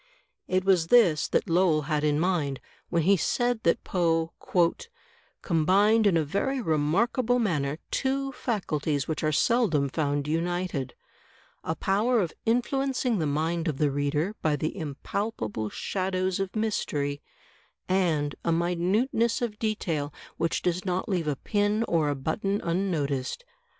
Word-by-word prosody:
It 185 Hz, 0 st, 0 dB
was 180 Hz, -4 st, +3 dB
this 180 Hz, -9 st, +5 dB
that -, -, 0 dB
Lowell 165 Hz, -3 st, +3 dB
had 150 Hz, +1 st, -1 dB
in 150 Hz, -1 st, +2 dB
mind, 160 Hz, -6 st, 0 dB, 0.3 s
when 170 Hz, -2 st, +1 dB
he 195 Hz, +5 st, +5 dB
said 240 Hz, +6 st, 0 dB
that 170 Hz, -, +1 dB
Poe 165 Hz, -2 st, 0 dB, 1.1 s
"combined 200 Hz, +6 st, +3 dB
in 180 Hz, -4 st, +3 dB
a 160 Hz, -, +2 dB
very 200 Hz, -, -1 dB
remarkable 220 Hz, -, +1 dB
manner 155 Hz, -, 0 dB
two 275 Hz, 0 st, 0 dB
faculties 155 Hz, -, -2 dB
which 160 Hz, +1 st, -3 dB
are 155 Hz, -, +2 dB
seldom 165 Hz, -, +2 dB
found 145 Hz, -1 st, -1 dB
united, 165 Hz, -4 st, -2 dB, 0.4 s
— -, -, -29 dB, 0.3 s
a 160 Hz, -, -2 dB
power 215 Hz, +8 st, +1 dB
of 175 Hz, -6 st, -1 dB
influencing 250 Hz, -1 st, +1 dB
the 155 Hz, -, 0 dB
mind 160 Hz, +4 st, -1 dB
of 150 Hz, -4 st, -1 dB
the 145 Hz, -1 st, +2 dB
reader 145 Hz, +7 st, -1 dB
by 155 Hz, -2 st, +2 dB
the 155 Hz, +2 st, -3 dB
impalpable 145 Hz, -, -3 dB
shadows 185 Hz, -, -2 dB
of 195 Hz, +1 st, -3 dB
mystery, 145 Hz, -10 st, -1 dB, 0.7 s
and 165 Hz, -6 st, +1 dB
a 170 Hz, -, +1 dB
minuteness 185 Hz, +8 st, +1 dB
of 225 Hz, -4 st, -3 dB
detail 165 Hz, -10 st, -2 dB, 0.3 s
which 165 Hz, 0 st, -1 dB
does 180 Hz, 0 st, 0 dB
not 185 Hz, +2 st, -2 dB
leave 175 Hz, -5 st, 0 dB
a 150 Hz, -, 0 dB
pin 205 Hz, +7 st, 0 dB
or 165 Hz, -8 st, +1 dB
a 145 Hz, -, 0 dB
button 195 Hz, +9 st, -1 dB
unnoticed. 165 Hz, -, -1 dB
175 Hz, 145 wpm, -27 LUFS, 150-205 Hz, 1.1 s, this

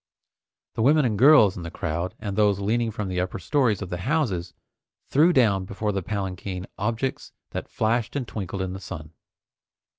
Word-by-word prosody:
The -, -, -3 dB
women 145 Hz, +4 st, +4 dB
and 110 Hz, -4 st, +1 dB
girls 115 Hz, -4 st, +6 dB
in 90 Hz, -, -6 dB
the 85 Hz, -, -5 dB
crowd, 85 Hz, +3 st, -3 dB
and 100 Hz, -2 st, -5 dB
those 105 Hz, -2 st, +3 dB
leaning 115 Hz, +3 st, 0 dB
from 105 Hz, -2 st, -4 dB
the 90 Hz, -1 st, -1 dB
upper 90 Hz, -, -3 dB
stories 110 Hz, -, +1 dB
of 95 Hz, -, -7 dB
the 90 Hz, -, -2 dB
houses, 95 Hz, -, -1 dB, 0.5 s
threw 155 Hz, +6 st, +5 dB
down 110 Hz, -, +3 dB
before 105 Hz, +2 st, -2 dB
the 95 Hz, -1 st, -2 dB
palanquin 95 Hz, -1 st, -4 dB
objects 115 Hz, +5 st, -2 dB, 0.2 s
that -, -, -5 dB
flashed 115 Hz, +1 st, 0 dB
and 130 Hz, -4 st, -2 dB
twinkled 95 Hz, -3 st, -4 dB
in 95 Hz, 0 st, -4 dB
the 95 Hz, -, -6 dB
sun. 80 Hz, -5 st, -8 dB
100 Hz, 180 wpm, -25 LUFS, 95-120 Hz, 0.5 s, girls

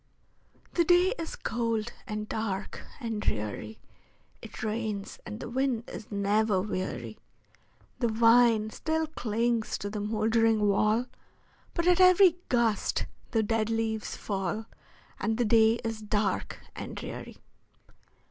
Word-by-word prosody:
The 345 Hz, -, +3 dB
day 355 Hz, +4 st, +4 dB
is 330 Hz, -, -4 dB
cold, 230 Hz, -1 st, -2 dB
and 215 Hz, -1 st, -4 dB
dark, 210 Hz, -3 st, -4 dB
and 225 Hz, -5 st, -3 dB
dreary; 105 Hz, -, -3 dB, 0.6 s
It -, -, -9 dB
rains, 215 Hz, -2 st, -3 dB
and 215 Hz, 0 st, -6 dB
the -, -, -6 dB
wind 250 Hz, -1 st, -1 dB
is 215 Hz, -, -8 dB
never 205 Hz, 0 st, +2 dB
weary; 125 Hz, -, -4 dB, 0.8 s
The 240 Hz, -, +2 dB
vine 230 Hz, -1 st, +4 dB
still 320 Hz, +6 st, -1 dB
clings 235 Hz, -5 st, -1 dB
to 205 Hz, -, -5 dB
the 210 Hz, -, -3 dB
moldering 220 Hz, 0 st, +2 dB
wall, 215 Hz, +4 st, +2 dB, 0.7 s
But 340 Hz, -, 0 dB
at 360 Hz, 0 st, +5 dB
every 365 Hz, -1 st, +7 dB
gust 235 Hz, -4 st, +1 dB, 0.2 s
the 225 Hz, -1 st, +1 dB
dead 220 Hz, 0 st, 0 dB
leaves 225 Hz, -1 st, -2 dB
fall, 195 Hz, +1 st, -3 dB, 0.5 s
And 220 Hz, 0 st, 0 dB
the 245 Hz, -, +2 dB
day 220 Hz, 0 st, +5 dB
is 225 Hz, -1 st, -3 dB
dark 210 Hz, -2 st, -1 dB, 0.2 s
and -, -, -6 dB
dreary. -, -, -7 dB
220 Hz, 130 wpm, -29 LUFS, 210-235 Hz, 0.8 s, every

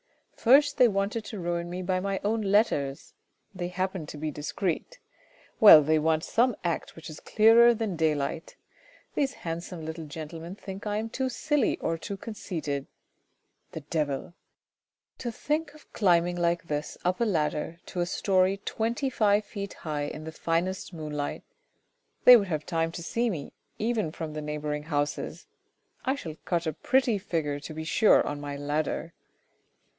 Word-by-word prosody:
First 285 Hz, +5 st, +5 dB
they 250 Hz, -, +7 dB
wanted 205 Hz, +2 st, -1 dB
to 215 Hz, -, -6 dB
ruin 170 Hz, 0 st, -2 dB
me 180 Hz, +1 st, -4 dB
by 185 Hz, 0 st, 0 dB
my 195 Hz, 0 st, -2 dB
own 220 Hz, +2 st, +1 dB
letters; 195 Hz, -10 st, +1 dB, 0.4 s
they 180 Hz, -2 st, -3 dB
happen 185 Hz, -2 st, -3 dB
to 150 Hz, -, -8 dB
be 155 Hz, +1 st, -3 dB
discreet; 175 Hz, -, -3 dB, 0.6 s
well, 165 Hz, -8 st, +10 dB
they 155 Hz, +2 st, +3 dB
want 160 Hz, +1 st, +1 dB
some 245 Hz, 0 st, +2 dB
act 170 Hz, -2 st, -2 dB
which 165 Hz, -1 st, -9 dB
is 155 Hz, -, -9 dB
clearer 230 Hz, +2 st, +6 dB
than 215 Hz, -4 st, -2 dB
daylight. 155 Hz, 0 st, -1 dB, 0.6 s
These 275 Hz, -2 st, 0 dB
handsome 165 Hz, 0 st, -5 dB
little 160 Hz, 0 st, -6 dB
gentlemen 165 Hz, +4 st, -7 dB
think 195 Hz, 0 st, -8 dB
I 210 Hz, 0 st, 0 dB
am 220 Hz, +1 st, -3 dB
too 260 Hz, +2 st, -1 dB
silly 295 Hz, +3 st, +1 dB
or 165 Hz, 0 st, -2 dB
too 200 Hz, -, -5 dB
conceited. 160 Hz, -, -4 dB, 0.9 s
The 160 Hz, -, -5 dB
devil! 150 Hz, 0 st, -2 dB, 0.9 s
To 240 Hz, -, -3 dB
think 300 Hz, +5 st, -2 dB
of 305 Hz, -, -19 dB
climb 175 Hz, -5 st, +4 dB
ing 175 Hz, 0 st, -3 dB
like 170 Hz, 0 st, +1 dB
this 150 Hz, -2 st, -4 dB
up 180 Hz, +4 st, +1 dB
a -, -, +4 dB
ladder 160 Hz, -4 st, -1 dB
to 180 Hz, -, -6 dB
a 175 Hz, -, +1 dB
storey 190 Hz, +1 st, +2 dB
twenty 235 Hz, +5 st, -1 dB
five 210 Hz, -2 st, +3 dB
feet 200 Hz, -2 st, -6 dB
high 150 Hz, -2 st, -1 dB
in 155 Hz, +1 st, -6 dB
the 160 Hz, -, -6 dB
finest 170 Hz, +4 st, -1 dB
moonlight. 150 Hz, -4 st, -4 dB, 0.8 s
They 250 Hz, -, +12 dB
would 205 Hz, -4 st, +3 dB
have 155 Hz, -4 st, -2 dB
time 165 Hz, -1 st, 0 dB
to 170 Hz, -, -6 dB
see 235 Hz, +7 st, 0 dB
me, 155 Hz, -9 st, -5 dB, 0.2 s
even 220 Hz, -6 st, 0 dB
from 160 Hz, -1 st, -6 dB
the 155 Hz, -, -4 dB
neighbouring 150 Hz, 0 st, -3 dB
houses. 145 Hz, -1 st, -2 dB, 0.6 s
I 265 Hz, -, +1 dB
shall 160 Hz, -, -7 dB
cut 170 Hz, -1 st, 0 dB
a 160 Hz, -, -1 dB
pretty 250 Hz, -, +2 dB
figure 155 Hz, -7 st, -2 dB
to 150 Hz, +2 st, -8 dB
be 160 Hz, -, -4 dB
sure 210 Hz, +7 st, +4 dB
on 145 Hz, 0 st, -4 dB
my 145 Hz, -1 st, -5 dB
ladder 150 Hz, +3 st, -2 dB
175 Hz, 170 wpm, -28 LUFS, 155-210 Hz, 0.9 s, They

